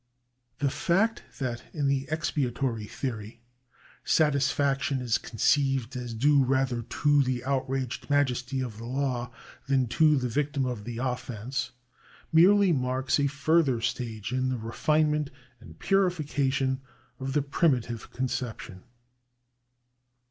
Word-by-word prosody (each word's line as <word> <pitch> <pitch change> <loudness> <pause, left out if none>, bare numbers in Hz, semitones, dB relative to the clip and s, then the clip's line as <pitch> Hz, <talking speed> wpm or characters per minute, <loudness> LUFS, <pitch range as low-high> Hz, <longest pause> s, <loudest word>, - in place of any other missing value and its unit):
The 140 -2 0
fact 200 +11 +1 0.2
that 120 -3 -3
in 145 -2 -1
the 135 0 0
ex 155 +1 -1
piatory 120 -5 -1
theory 115 -3 -5 0.6
satisfaction 140 -2 +2
is 120 -3 0
conceived 135 +1 +1
as 120 -2 -5
due 140 +4 +4
rather 130 -2 +1
to 145 +5 +2
the 125 -2 -1
outraged 130 -1 -2
majesty 130 -2 +1
of 120 -5 -5
the 115 - -7
law, 125 -1 -2 0.4
than 135 -2 +2
to 155 +3 +4
the 125 -1 0
victim 140 +2 -1
of 120 -5 -4
the 120 -1 -5
offence, 125 0 -3 0.6
merely 190 +4 +6
marks 130 -1 0
a 140 - +3
further 140 -2 +2
stage 115 -1 -3
in 130 0 0
the 130 - -1
refinement 150 +6 +1 0.3
and 85 -9 -14
purification 145 -8 +1 0.4
of 135 0 -3
the 145 - +2
primitive 130 -6 0
conception. 120 -6 -4
130 Hz, 125 wpm, -28 LUFS, 120-145 Hz, 0.6 s, merely